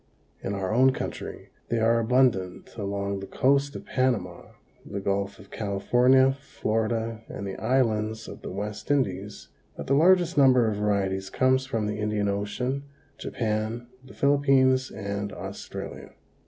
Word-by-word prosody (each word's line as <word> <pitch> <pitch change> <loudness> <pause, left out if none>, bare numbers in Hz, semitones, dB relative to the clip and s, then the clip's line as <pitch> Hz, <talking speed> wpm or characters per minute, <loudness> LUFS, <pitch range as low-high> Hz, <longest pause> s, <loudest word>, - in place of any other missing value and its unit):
In 100 - -3
our 95 +1 -2
own 130 +3 +5
country - - -6 0.2
they 115 - +1
are 115 +1 +3
abundant 115 -6 +1
along 100 -2 -3
the 95 - -7
coast 140 +2 +2
of - - -7
Panama, 120 -9 -1 0.4
the 100 - -5
Gulf 100 0 -1
of 100 - -16
California, 125 +6 +3
Florida 115 -3 -2
and 100 - -6
the 95 -1 -4
islands 110 -3 0
of - - -9
the - - -6
West 105 +2 -5
Indies, 105 -8 -1 0.3
but - - -5
the 135 - +1
largest 175 +1 +4
number 130 -4 +6
of 105 -2 -1
varieties 95 -2 0
comes 130 +4 +2
from 115 -5 -1
the 105 0 -3
Indian 105 -1 0
Ocean, 115 +7 -2 0.4
Japan, 110 +1 -2 0.2
the 130 - -14
Philippines 135 -2 +3
and 100 -1 -4
Australia. - - -7
110 Hz, 145 wpm, -26 LUFS, 100-130 Hz, 0.4 s, number